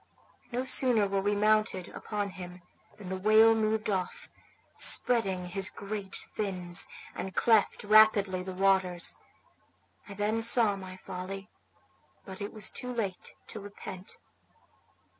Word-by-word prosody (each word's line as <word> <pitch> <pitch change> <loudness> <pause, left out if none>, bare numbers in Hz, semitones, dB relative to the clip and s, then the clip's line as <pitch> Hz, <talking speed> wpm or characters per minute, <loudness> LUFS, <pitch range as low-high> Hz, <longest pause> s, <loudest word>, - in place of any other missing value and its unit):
No 250 +2 -2
sooner 250 -5 +4
were 195 0 0
we 205 +1 +1
mounted 215 -3 +1
upon 205 -2 -4
him 180 -1 -9 0.3
than 200 -4 -9
the 190 - -3
whale 215 +3 +6
moved 220 0 0
off, 190 -3 -3 0.5
spreading 190 -7 +2
his 195 +2 -2
great 200 -1 -6
fins, 180 -4 -2 0.3
and 190 -2 -6
cleft 225 -3 +3
rapidly 210 -3 +5
the 190 +1 -6
waters. 185 -2 +1 0.9
I 200 - -8
then 210 +3 0
saw 225 -2 +3
my 185 -1 -9
folly, 190 +2 -7 0.7
but 190 -1 -9
it 205 - -4
was 215 -3 -1
too 250 - -5
late 205 -6 -4
to 215 - -7
repent. 200 -2 -9
200 Hz, 130 wpm, -30 LUFS, 185-215 Hz, 0.9 s, whale